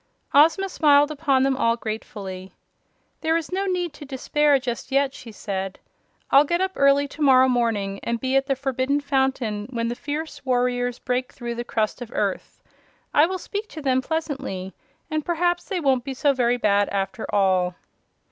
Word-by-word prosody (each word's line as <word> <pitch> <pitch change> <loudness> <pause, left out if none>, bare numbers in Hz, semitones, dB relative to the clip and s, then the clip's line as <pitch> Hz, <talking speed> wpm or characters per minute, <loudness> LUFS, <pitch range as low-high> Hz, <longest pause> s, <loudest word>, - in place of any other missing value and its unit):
Ozma 325 +7 +5
smiled 295 -4 +4
upon 280 -3 +1
them 270 0 +2
all 230 -3 +1
gratefully. 195 -4 -6 0.7
"There 320 +1 +1
is 330 0 -5
no 390 +2 -1
need 355 -4 -1
to 295 - -11
despair 290 +1 +2
just 250 0 -5
yet," 275 0 +2
she 235 - -10
said. 195 -2 -4 0.5
"I'll 275 - +7
get 345 +4 0
up 380 0 0
early 280 +1 +4
to 310 - -11
morrow 260 -2 +6
morning 225 -6 0
and 235 0 -2
be 260 +2 -1
at 270 0 +2
the 275 - +1
Forbidden 270 +1 0
Fountain 265 -7 -1
when 230 -2 -2
the - - -1
fierce 300 +4 -5
warriors 245 -1 0
break 250 0 -2
through 240 -2 -5
the 240 0 -4
crust 220 0 -2
of 245 - -5
the - - -13
earth. - - -3 0.5
I 300 +2 +5
will 375 +1 -3
speak 410 +3 -5
to 315 - -9
them 260 -1 +2
pleasantly 270 - -4 0.4
and 310 -1 -1
perhaps 350 +1 0
they 385 -5 -2
won't 265 -5 +2
be 270 -1 -5
so 280 +2 +2
very 245 -2 +1
bad, 205 -3 +2
after 200 +3 -3
all." 185 -3 +2
265 Hz, 185 wpm, -23 LUFS, 235-295 Hz, 0.7 s, I'll